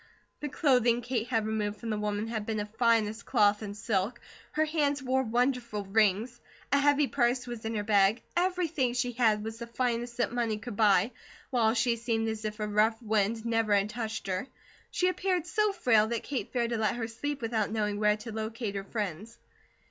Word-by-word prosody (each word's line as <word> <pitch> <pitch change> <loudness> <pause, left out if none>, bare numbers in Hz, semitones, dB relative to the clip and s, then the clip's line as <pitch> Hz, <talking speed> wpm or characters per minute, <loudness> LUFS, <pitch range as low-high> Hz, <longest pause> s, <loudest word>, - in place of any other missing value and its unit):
The 295 - -4
clothing 245 -5 +3
Kate 240 -1 -2
had 225 -3 0
removed 210 -1 -2
from 225 +1 -4
the 210 - -1
woman 210 0 -1
had 225 -2 -3
been 215 0 -2
of 210 0 -5
finest 225 -1 +2
cloth 210 -4 +3
and 205 -1 -6
silk. 220 +1 -1 0.3
Her 310 +1 +2
hands 290 -3 0
wore 260 0 +2
wonderful 240 -3 0
rings. 215 +3 +1 0.3
A 280 - +4
heavy 290 +1 +4
purse 250 -1 +1
was 240 -3 -7
in 225 0 -2
her 210 - -1
bag. 205 +1 +3
Everything 345 -8 +1
she 245 0 0
had 220 -3 +2
was 225 +1 -6
the 235 - -6
finest 235 0 -2
that 240 - 0
money 230 -3 0
could 225 0 -7
buy, 205 +1 +4 0.4
while 230 -3 +3
she 235 0 +2
seemed 225 -1 -1
as 220 0 -4
if 215 0 -4
a 210 - -1
rough 215 +2 +2
wind 220 0 0
never 225 -2 +2
had 200 +1 +1
touched 225 -1 -4
her. 190 +5 -2 0.4
She 365 - +1
appeared 365 -1 0
so 425 +3 +1
frail 225 - +3
that 235 0 -2
Kate 275 -3 -4
feared 240 -2 0
to 230 - -1
let 215 -1 +1
her 230 -2 -3
sleep 285 +5 -4
without 225 -2 -1
knowing 210 -1 -1
where 210 0 +3
to 215 +2 -8
locate 220 0 -4
her 195 -1 -3
friends. 205 +1 -5
225 Hz, 200 wpm, -29 LUFS, 215-245 Hz, 0.4 s, A